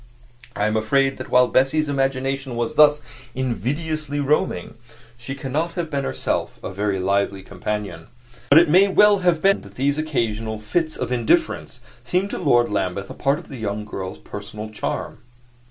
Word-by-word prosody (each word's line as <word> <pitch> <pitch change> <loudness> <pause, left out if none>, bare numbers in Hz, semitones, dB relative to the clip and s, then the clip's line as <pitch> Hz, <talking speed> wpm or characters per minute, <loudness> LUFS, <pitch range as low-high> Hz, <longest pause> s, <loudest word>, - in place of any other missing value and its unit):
I 105 - 0
am 110 0 0
afraid 135 +5 +2
that - - -7
while 125 0 +5
Bessie's 135 +5 +2
imagination 135 -1 -1
was 120 -1 -1
thus 150 -1 +5 0.3
invidiously 145 - -2
roaming, 140 -11 0 0.4
she 120 +3 -7
cannot 150 +5 -2
have 170 -3 -4
been 140 -1 -1
herself - - -2
a - - -5
very 100 0 -1
lively 100 +1 0
companion; 100 -3 -5 0.4
but 145 - +7
it 170 +1 +7
may 185 +6 +6
well 205 +1 +5
have 175 -3 +1
been 195 0 +4
that 100 0 -14
these 140 +3 0
occasional 115 -8 -2
fits 155 +9 -1
of - - -3
indifference 120 -3 0 0.2
seemed 190 +3 0
to - - -3
Lord 120 -8 +3
Lambeth 100 -1 -2
a - - -6
part 140 +1 +1
of - - -11
the 135 - -7
young 105 -1 -3
girl's 95 -3 -6
personal 105 +1 -8
charm. 110 - -4
130 Hz, 170 wpm, -22 LUFS, 105-150 Hz, 0.4 s, but